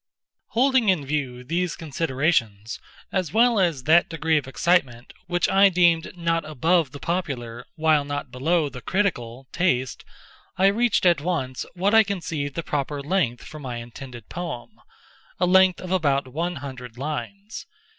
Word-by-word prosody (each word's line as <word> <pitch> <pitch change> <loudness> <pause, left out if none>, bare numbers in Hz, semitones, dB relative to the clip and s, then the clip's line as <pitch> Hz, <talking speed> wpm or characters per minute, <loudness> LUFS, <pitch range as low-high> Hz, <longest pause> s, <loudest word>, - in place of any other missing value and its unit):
Holding 260 -3 +4
in 170 -7 +2
view 135 -4 -3
these 170 +5 -1
considerations, 135 -8 -1 0.3
as 185 -5 -1
well 230 0 +4
as 165 -8 +1
that 160 +5 +4
degree 160 -1 0
of 145 -4 0
excitement 135 -5 0
which 175 0 +1
I 195 +1 +5
deemed 175 -1 +2
not 165 -1 0
above 160 +1 +1
the 145 - -8
popular, 125 -10 -4
while 155 -2 +3
not 145 -2 -5
below 155 +5 +1
the 130 -2 -9
critical, 135 - -2
taste, 130 -9 0 0.5
I 190 - +3
reached 235 -3 +1
at 170 -5 +4
once 140 -7 -3
what 195 +4 +1
I 225 - +8
conceived 165 -9 -3
the 165 - -3
proper 145 -1 -3
length 145 -7 0
for 155 - -10
my 130 -4 -5
intended 120 0 -9
poem—a 170 +2 -7
length 185 0 +5
of 185 - -7
about 140 -7 +1
one 170 +7 -3
hundred 130 -4 -8
lines. 200 - -6
160 Hz, 150 wpm, -24 LUFS, 130-180 Hz, 0.5 s, I